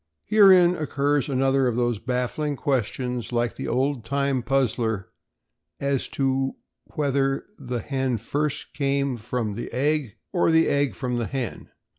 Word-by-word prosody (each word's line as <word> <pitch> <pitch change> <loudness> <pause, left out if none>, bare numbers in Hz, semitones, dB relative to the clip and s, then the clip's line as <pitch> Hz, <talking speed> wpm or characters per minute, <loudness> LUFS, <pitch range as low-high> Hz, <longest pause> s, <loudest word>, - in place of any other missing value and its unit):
Herein 190 -4 +6
occurs 145 -1 0
another 135 0 +2
of 120 - 0
those 120 -3 0
baffling 125 +5 -2
questions, 125 -2 -2
like 120 -1 0
the - - -5
old 135 -1 0
time 140 +1 0
puzzler 115 -5 0 0.7
as 140 -1 0
to 135 -1 0 0.4
whether 135 -2 0
the 125 -4 -3
hen 130 -2 -1
first 145 +7 -3
came 140 -2 0
from 115 -1 -3
the 115 - -6
egg 140 -2 0 0.2
or 175 -2 +3
the 160 0 +4
egg 140 -1 +1
from 125 -2 -2
the 115 - -1
hen. 130 -4 -4
135 Hz, 140 wpm, -25 LUFS, 125-140 Hz, 0.7 s, Herein